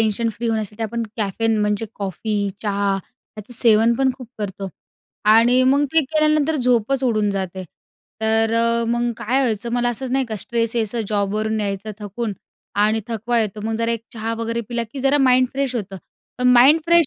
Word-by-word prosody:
Tension 225 Hz, +1 st, +1 dB
free 235 Hz, +2 st, -5 dB
होण्यासाठी 220 Hz, 0 st, -3 dB
आपण 230 Hz, +2 st, -2 dB
caffeine 220 Hz, +1 st, 0 dB
म्हणजे 210 Hz, +1 st, 0 dB
कॉफी, 200 Hz, +1 st, -2 dB
चहा 200 Hz, -2 st, 0 dB, 0.4 s
त्याचं 215 Hz, +2 st, -9 dB
सेवनपण 235 Hz, +3 st, +4 dB
खूप 250 Hz, -4 st, -11 dB
करतो 200 Hz, -2 st, -4 dB, 0.6 s
आणि 240 Hz, +3 st, +5 dB
मग 275 Hz, +3 st, +3 dB
ते 325 Hz, -, +7 dB
केल्यानंतर 305 Hz, +1 st, +2 dB
झोपच 250 Hz, 0 st, +1 dB
उडून 215 Hz, -4 st, +1 dB
जाते. 190 Hz, -1 st, -4 dB, 0.6 s
तर 220 Hz, 0 st, +2 dB
अ, 230 Hz, 0 st, +2 dB
मग 240 Hz, +1 st, 0 dB
काय 250 Hz, +6 st, 0 dB
व्हायचं. 235 Hz, -3 st, -1 dB
मला 245 Hz, 0 st, +1 dB
असंच 245 Hz, +2 st, -3 dB
नाही 265 Hz, +1 st, +1 dB
का 220 Hz, -2 st, -4 dB
स्ट्रेस 230 Hz, +2 st, -1 dB
यायचं. 230 Hz, 0 st, 0 dB
जॉबवरून 215 Hz, +1 st, -1 dB
यायचं 200 Hz, +1 st, -3 dB
थकून 210 Hz, +2 st, -4 dB, 0.5 s
आणि 215 Hz, +1 st, +2 dB
थकवा 235 Hz, +1 st, -1 dB
येतो. 210 Hz, -1 st, -3 dB
मग 225 Hz, -, -1 dB
जरा 230 Hz, +1 st, 0 dB
एक 230 Hz, -1 st, -4 dB
चहा 225 Hz, 0 st, -3 dB
वगैरे 230 Hz, 0 st, -2 dB
पिला, 235 Hz, -1 st, -1 dB
की 275 Hz, -, -5 dB
जरा 275 Hz, +2 st, +3 dB
माइंड 255 Hz, -1 st, +4 dB
फ्रेश 270 Hz, -2 st, -2 dB
होतं. 195 Hz, -3 st, -5 dB, 0.4 s
पण 250 Hz, 0 st, +3 dB
माईंड 265 Hz, +6 st, +6 dB
फ्रेश 340 Hz, -1 st, +4 dB
230 Hz, 175 wpm, -21 LUFS, 210-250 Hz, 0.6 s, ते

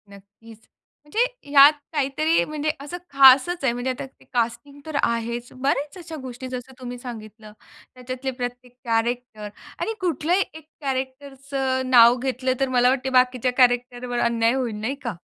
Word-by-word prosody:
नक्कीच. 205 Hz, +3 st, -16 dB, 0.4 s
म्हणजे 300 Hz, +10 st, -5 dB, 0.3 s
ह्यात 285 Hz, +1 st, +8 dB, 0.2 s
काहीतरी 305 Hz, +3 st, +1 dB
म्हणजे 305 Hz, 0 st, -3 dB
असं 295 Hz, +5 st, -6 dB
खासच 275 Hz, +5 st, +6 dB
आहे, 265 Hz, -, +3 dB
म्हणजे 245 Hz, +2 st, -3 dB
आता 255 Hz, -, -6 dB
ते 265 Hz, -, -20 dB
कास्टिंग 245 Hz, +4 st, -2 dB
तर 315 Hz, -2 st, -6 dB
आहेच. 235 Hz, +1 st, -2 dB
बऱ्याच 280 Hz, +5 st, -2 dB
अशा 330 Hz, -2 st, -8 dB
गोष्टी 255 Hz, 0 st, -7 dB
जसं 255 Hz, +1 st, -7 dB
तुम्ही 245 Hz, -1 st, -7 dB
सांगितलं. 220 Hz, -3 st, -10 dB, 0.4 s
त्याच्यातले 255 Hz, +1 st, -5 dB
प्रत्येक 245 Hz, 0 st, -6 dB
कॅरेक्टर 230 Hz, -1 st, -2 dB, 0.3 s
आणि 450 Hz, -, -2 dB
कुठलाही 355 Hz, +1 st, +1 dB
एक 315 Hz, -1 st, -12 dB, 0.2 s
कॅरेक्टरचं 265 Hz, -1 st, -3 dB
नाव 240 Hz, -1 st, +7 dB
घेतलं 260 Hz, 0 st, -1 dB
तर 270 Hz, -1 st, +1 dB
मला 250 Hz, -1 st, +4 dB
वाटतं 265 Hz, 0 st, -1 dB
बाकीच्या 255 Hz, 0 st, +3 dB
कॅरेक्टरवर 245 Hz, -1 st, +1 dB
अन्याय 230 Hz, 0 st, +2 dB
होईल, 250 Hz, -5 st, -2 dB
नाही 250 Hz, +6 st, -2 dB
का? 235 Hz, -6 st, -4 dB
255 Hz, 150 wpm, -23 LUFS, 240-275 Hz, 0.4 s, ह्यात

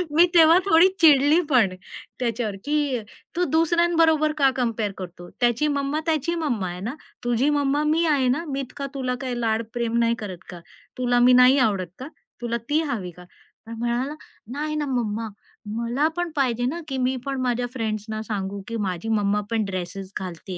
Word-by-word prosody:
मी 345 Hz, +2 st, +7 dB
तेव्हा 325 Hz, +1 st, +7 dB
थोडी 340 Hz, 0 st, +6 dB
चिडलीपण 290 Hz, -, +5 dB, 0.5 s
त्याच्यावर, 230 Hz, -4 st, -2 dB
की 290 Hz, -4 st, 0 dB, 0.4 s
"तू 360 Hz, -, +1 dB
दुसऱ्यांबरोबर 330 Hz, -1 st, +3 dB
का 275 Hz, -2 st, +5 dB
कंपेअर 230 Hz, -4 st, -1 dB
करतो? 175 Hz, -1 st, -9 dB
त्याची 240 Hz, +5 st, +2 dB
मम्मा 285 Hz, +1 st, -1 dB
त्याची 320 Hz, +2 st, 0 dB
मम्मा 245 Hz, -, -1 dB
आहे 175 Hz, +1 st, -6 dB
ना. 235 Hz, +8 st, -4 dB, 0.3 s
तुझी 240 Hz, +4 st, +1 dB
मम्मा 290 Hz, 0 st, +1 dB
मी 325 Hz, +2 st, +2 dB
आहे 275 Hz, -4 st, +2 dB
ना. 300 Hz, +7 st, 0 dB
मी 275 Hz, -1 st, -3 dB
इतका 275 Hz, +2 st, -6 dB
तुला 255 Hz, -2 st, -1 dB
काही 250 Hz, -2 st, -3 dB
लाड 225 Hz, 0 st, 0 dB
प्रेम 235 Hz, -1 st, -1 dB
नाही 235 Hz, 0 st, +2 dB
करत 190 Hz, -4 st, -7 dB
का? 175 Hz, -2 st, -8 dB, 0.4 s
तुला 245 Hz, -1 st, +2 dB
मी 250 Hz, +1 st, +6 dB
नाही 255 Hz, +2 st, +7 dB
आवडत 195 Hz, -7 st, +1 dB
का? 260 Hz, -, -6 dB, 0.3 s
तुला 235 Hz, 0 st, -1 dB
ती 310 Hz, +2 st, +3 dB
हवी 185 Hz, -6 st, -4 dB
का?" 180 Hz, +1 st, -14 dB, 0.4 s
तर -, -, -9 dB
म्हणाला 240 Hz, +5 st, -1 dB, 0.4 s
"नाही 305 Hz, +1 st, -2 dB
ना 300 Hz, -1 st, -1 dB
मम्मा 230 Hz, -4 st, -2 dB, 0.5 s
मला 240 Hz, +6 st, 0 dB
पण 350 Hz, -2 st, -2 dB
पाहिजे 245 Hz, -3 st, +1 dB
ना, 335 Hz, +7 st, -2 dB
की 265 Hz, -2 st, -3 dB
मी 260 Hz, -, -1 dB
पण 270 Hz, -2 st, -2 dB
माझ्या 245 Hz, -1 st, 0 dB
फ्रेंड्सना 215 Hz, -2 st, -3 dB
सांगू, 200 Hz, -2 st, -4 dB
की 230 Hz, 0 st, -4 dB
माझी 185 Hz, +5 st, -4 dB
मम्मा 205 Hz, +1 st, +1 dB
पण 220 Hz, -2 st, +1 dB
ड्रेसेस 185 Hz, 0 st, -5 dB
घालते, 180 Hz, 0 st, -7 dB
245 Hz, 180 wpm, -24 LUFS, 220-295 Hz, 0.5 s, मी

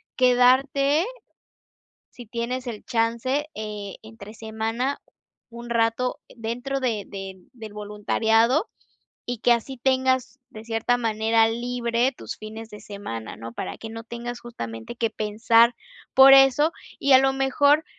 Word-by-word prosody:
quedarte, 265 Hz, +5 st, +3 dB, 1.1 s
sí 245 Hz, -, -11 dB
tienes 245 Hz, +3 st, -4 dB
el 225 Hz, -3 st, -6 dB
chance, 235 Hz, +5 st, 0 dB
eh, 210 Hz, -2 st, -6 dB
entre 220 Hz, -1 st, -12 dB
semana, 225 Hz, +5 st, -3 dB, 0.5 s
un 235 Hz, 0 st, -10 dB
rato 230 Hz, +2 st, 0 dB, 0.2 s
dentro 245 Hz, +4 st, -3 dB
de 230 Hz, -6 st, -1 dB
de 195 Hz, -1 st, -7 dB, 0.2 s
del 220 Hz, -4 st, -10 dB
voluntariado 220 Hz, -, +1 dB, 0.6 s
y 245 Hz, -, -3 dB
que 240 Hz, -, +4 dB
así 240 Hz, +3 st, -2 dB
tengas 260 Hz, 0 st, +1 dB
de 215 Hz, 0 st, -11 dB
cierta 225 Hz, +2 st, 0 dB
manera 225 Hz, 0 st, +2 dB
libre 240 Hz, +1 st, -1 dB
tus -, -, -7 dB
fines 220 Hz, +1 st, -9 dB
de 210 Hz, -, -10 dB
semana, 115 Hz, -, -7 dB
¿no? 115 Hz, +1 st, -8 dB
Para -, -, -5 dB
que 225 Hz, -, -8 dB
no 225 Hz, 0 st, -7 dB
tengas 235 Hz, +1 st, -6 dB
justamente 115 Hz, -, -7 dB
que 230 Hz, -1 st, 0 dB
pensar 225 Hz, +2 st, +3 dB, 0.4 s
por 265 Hz, +1 st, +9 dB
eso 270 Hz, +4 st, +5 dB, 0.3 s
y 280 Hz, -, +2 dB
a 260 Hz, -, +9 dB
lo 270 Hz, 0 st, +3 dB
mejor 285 Hz, +3 st, +3 dB
235 Hz, 135 wpm, -24 LUFS, 220-260 Hz, 1.1 s, por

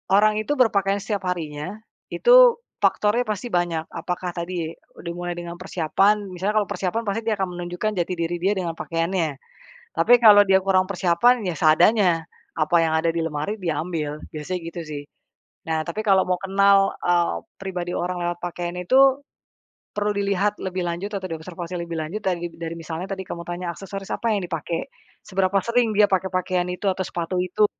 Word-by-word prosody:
orang 215 Hz, +1 st, +4 dB
itu 285 Hz, +7 st, -1 dB
berpakaian 200 Hz, -6 st, +2 dB
setiap 200 Hz, -3 st, -3 dB
harinya 160 Hz, 0 st, -4 dB, 0.3 s
itu -, -, +6 dB, 0.2 s
faktornya 215 Hz, +4 st, +2 dB
pasti 215 Hz, +3 st, -3 dB
banyak. 175 Hz, -2 st, 0 dB
Apakah 180 Hz, +2 st, -4 dB
tadi 170 Hz, -1 st, -4 dB, 0.3 s
dimulai 175 Hz, +1 st, -4 dB
dengan 175 Hz, 0 st, -7 dB
persiapan, 195 Hz, +3 st, +1 dB
misalnya 190 Hz, +4 st, -2 dB
kalau -, -, -12 dB
persiapan 195 Hz, +5 st, -1 dB
pasti 210 Hz, +1 st, -2 dB
dia 220 Hz, -, +2 dB
akan 190 Hz, -2 st, -2 dB
menunjukkan 175 Hz, +5 st, -2 dB
jati 175 Hz, +1 st, -1 dB
diri 170 Hz, 0 st, -2 dB
dia 190 Hz, +4 st, +2 dB
dengan 180 Hz, -3 st, -2 dB
pakaiannya. 165 Hz, -2 st, -1 dB, 0.6 s
Tapi 245 Hz, 0 st, +6 dB
kalau 210 Hz, -3 st, +9 dB
dia 190 Hz, 0 st, +6 dB
kurang 190 Hz, -1 st, +3 dB
persiapan, 195 Hz, +7 st, +3 dB
ya 180 Hz, -, -1 dB
seadanya, 170 Hz, +2 st, +4 dB, 0.3 s
apa 160 Hz, +2 st, +2 dB
yang 160 Hz, -, 0 dB
ada 160 Hz, +1 st, +1 dB
di 170 Hz, -, 0 dB
lemari 155 Hz, +5 st, -2 dB
diambil, 160 Hz, -3 st, -2 dB
biasanya 160 Hz, +4 st, -4 dB
gitu, 170 Hz, +1 st, -6 dB
sih. 150 Hz, -2 st, -6 dB, 0.6 s
Nah, 160 Hz, -1 st, 0 dB
tapi 170 Hz, +6 st, -3 dB
kalau 195 Hz, -3 st, +4 dB
mau 180 Hz, -, +2 dB
kenal, 195 Hz, 0 st, +4 dB
eee, 175 Hz, -1 st, +2 dB, 0.3 s
pribadi 180 Hz, -2 st, -4 dB
orang 180 Hz, +1 st, -2 dB
lewat 175 Hz, 0 st, -2 dB
pakaian 175 Hz, 0 st, -4 dB
itu, 265 Hz, +9 st, +4 dB, 0.7 s
perlu 210 Hz, 0 st, 0 dB
dilihat 200 Hz, 0 st, 0 dB
lebih 185 Hz, -1 st, -3 dB
lanjut 175 Hz, +4 st, -3 dB
atau 190 Hz, -, -6 dB
diobservasi 170 Hz, +1 st, -6 dB
lebih 170 Hz, -1 st, -5 dB
lanjut 160 Hz, +7 st, -4 dB
dari 175 Hz, -3 st, -2 dB
dari 165 Hz, 0 st, -6 dB
misalnya 165 Hz, +3 st, -6 dB
tadi 190 Hz, -1 st, -4 dB
kamu 170 Hz, -, -6 dB
tanya 175 Hz, 0 st, -3 dB
aksesoris 195 Hz, +2 st, -6 dB
apa 235 Hz, -, -1 dB
yang 195 Hz, -3 st, -2 dB
dipakai, 165 Hz, 0 st, -3 dB, 0.4 s
seberapa 190 Hz, 0 st, +1 dB
sering 235 Hz, 0 st, +2 dB
dia 210 Hz, -, +7 dB
pakai 190 Hz, -1 st, 0 dB
pakaian 185 Hz, -1 st, -1 dB
itu, 180 Hz, +3 st, -5 dB
atau 190 Hz, -1 st, +1 dB
sepatu 175 Hz, +1 st, -2 dB
itu, 185 Hz, +4 st, +2 dB
180 Hz, 175 wpm, -23 LUFS, 170-200 Hz, 0.7 s, kalau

